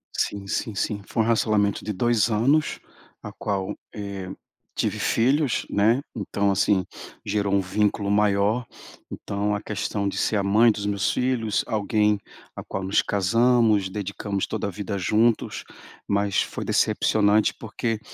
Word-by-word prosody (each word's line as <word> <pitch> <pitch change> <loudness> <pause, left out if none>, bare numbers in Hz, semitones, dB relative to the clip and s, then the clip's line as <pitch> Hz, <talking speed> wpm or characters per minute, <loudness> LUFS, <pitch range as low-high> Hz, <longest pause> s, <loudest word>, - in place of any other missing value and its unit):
Sim, 100 -1 -2
sim, 105 +2 -2
sim, 100 +1 -2
foi 115 - 0
um - - -2
racionamento 105 -3 +1
de 105 - -2
2 120 +2 +2
anos, 135 +8 +2 0.4
a - - -7
qual, 95 -2 -3 0.2
eh, 100 -3 -6 0.5
tive - - -1
filhos, 135 +3 +1
né, 115 +6 +3
então 100 -1 0
assim, 95 -1 +2 0.4
gerou 100 -1 0
um 100 - +4
vínculo 100 +1 0
maior. 105 +3 +2 0.5
Então 100 +1 -2
a 105 - -2
questão 105 -1 -2
de - - -3
ser 105 - +1
a 100 - 0
mãe 110 +4 +5
dos 105 -1 -4
meus 100 0 0
filhos, 125 -4 0
alguém 105 -1 +1 0.4
a - - -7
qual 95 - -5
nos 95 +2 +2
casamos, 110 0 +2
dedicamos 100 0 -3
toda - - -3
a - - -2
vida 100 +1 -4
juntos, 110 +5 +1 0.4
mas 100 -1 +1
foi - - -4
decepcionante, 105 0 +2
porque 115 0 -3
105 Hz, 150 wpm, -24 LUFS, 100-110 Hz, 0.5 s, mãe